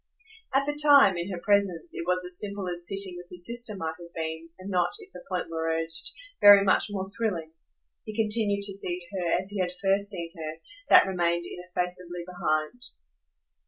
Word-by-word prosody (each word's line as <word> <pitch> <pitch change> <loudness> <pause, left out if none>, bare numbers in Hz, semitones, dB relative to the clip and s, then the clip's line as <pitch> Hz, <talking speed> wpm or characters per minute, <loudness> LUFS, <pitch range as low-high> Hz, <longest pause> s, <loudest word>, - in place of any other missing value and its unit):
At 275 0 +4
the 295 - 0
time, 280 -10 +7
in 175 +3 -3
her 180 - -3
presence, 190 -4 +1
it 170 - -6
was 180 0 +1
as 180 0 -4
simple 200 -2 -3
as 175 -1 -3
sitting 195 -2 -2
with 175 0 -10
his 180 -1 -3
sister 235 -1 +1
might 160 -3 -3
have 170 0 -11
been, 160 0 -4
and 190 +2 -7
not, 180 -2 +2
if 400 -3 -12
the - - -10
point 180 - -2
were 165 0 -1
urged, 165 - -3 0.3
very 205 -1 +10
much 195 - +3
more 190 -2 -3
thrilling. 195 -7 -3 0.5
He 215 - -8
continued 210 -2 +1
to 200 -1 -3
see 175 -2 -4
her 175 -3 -1
as 190 +2 -5
he 205 - -4
had 180 -1 0
first 200 +1 +1
seen 170 -5 -5
her 160 -1 -6 0.3
that - - +8
remained 170 -2 0
ineffaceably 180 0 -4
behind. 175 +3 -2
180 Hz, 195 wpm, -27 LUFS, 170-200 Hz, 0.5 s, very